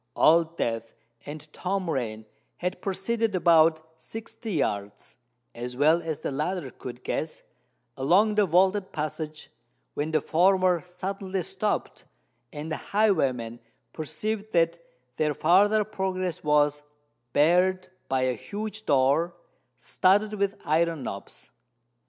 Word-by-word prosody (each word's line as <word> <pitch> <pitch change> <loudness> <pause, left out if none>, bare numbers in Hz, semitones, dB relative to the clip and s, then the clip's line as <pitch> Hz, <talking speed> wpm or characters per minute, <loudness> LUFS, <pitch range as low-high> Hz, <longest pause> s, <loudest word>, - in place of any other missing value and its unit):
Old 165 +1 +4
Death 115 0 -2 0.3
and 150 +1 -8
Tom 190 0 -2
Rain 110 -8 -3 0.3
had 180 0 -3
proceeded 210 +2 -1
about 165 -2 +4 0.2
sixty 225 +2 -7
yards, 100 - -3 0.4
as 125 +1 -6
well 155 +4 +4
as 160 -2 -4
the - - -3
latter 150 0 -2
could 125 -1 -9
guess, 155 0 -3 0.5
along 185 +11 +3
the 210 -1 +3
vaulted 190 +3 +2
passage, 155 0 -5 0.4
when 150 +2 -2
the 155 -1 +2
former 180 +2 +3
suddenly 190 +1 -4
stopped, - - -3 0.5
and 150 +2 -6
the - - -1
highwayman 135 - +1 0.3
perceived 210 +8 -4
that 170 0 +2 0.4
their 150 -1 +1
farther 205 +6 +4
progress 190 -4 -3
was 150 -1 +3 0.5
barred 180 +5 +3 0.2
by 130 -1 +1
a 130 0 +2
huge 215 - -6
door, 145 +6 +3 0.4
studded 205 - +2
with 200 -1 -1
iron 165 -1 +1
knobs. 100 -4 -8
170 Hz, 120 wpm, -27 LUFS, 150-190 Hz, 0.5 s, Old